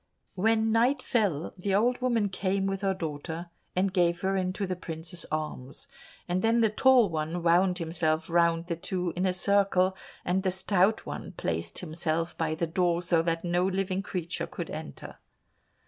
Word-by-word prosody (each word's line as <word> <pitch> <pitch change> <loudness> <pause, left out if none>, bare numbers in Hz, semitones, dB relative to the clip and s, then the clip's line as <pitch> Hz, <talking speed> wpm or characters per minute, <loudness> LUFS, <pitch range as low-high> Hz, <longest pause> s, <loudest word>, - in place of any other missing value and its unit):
When 220 +3 +2
night 250 +4 +2
fell, 195 - 0
the 190 +1 -1
old 245 +5 +2
woman 235 -5 +1
came 195 +1 -1
with 195 0 -2
her 195 -1 +1
daughter, 165 +1 -5 0.2
and 185 +1 +1
gave 175 -2 +2
her 195 0 0
into 185 +1 -1
the 185 -1 -2
princes's 165 0 -5
arms, 150 -4 -5 0.4
and 180 +1 0
then 230 +2 +3
the 220 -2 +3
Tall 255 0 +5
One 165 +1 -3
wound 180 +2 +4
himself 160 -1 -1
round 170 0 +2
the 170 -1 -2
two 180 0 -2
in 185 +2 +1
a - - +2
circle, 190 0 +2 0.3
and 185 +2 +1
the 190 - +1
Stout 190 +2 +1
One - - -6
placed 85 0 -3
himself 165 0 -2
by 160 -1 -1
the 170 - -1
door, 175 +1 +1
so 170 -1 +3
that 165 +1 -1
no 175 +1 +1
living 190 0 0
creature 180 -3 -4
could - - -6
enter. - - -8
180 Hz, 175 wpm, -28 LUFS, 165-195 Hz, 0.4 s, Tall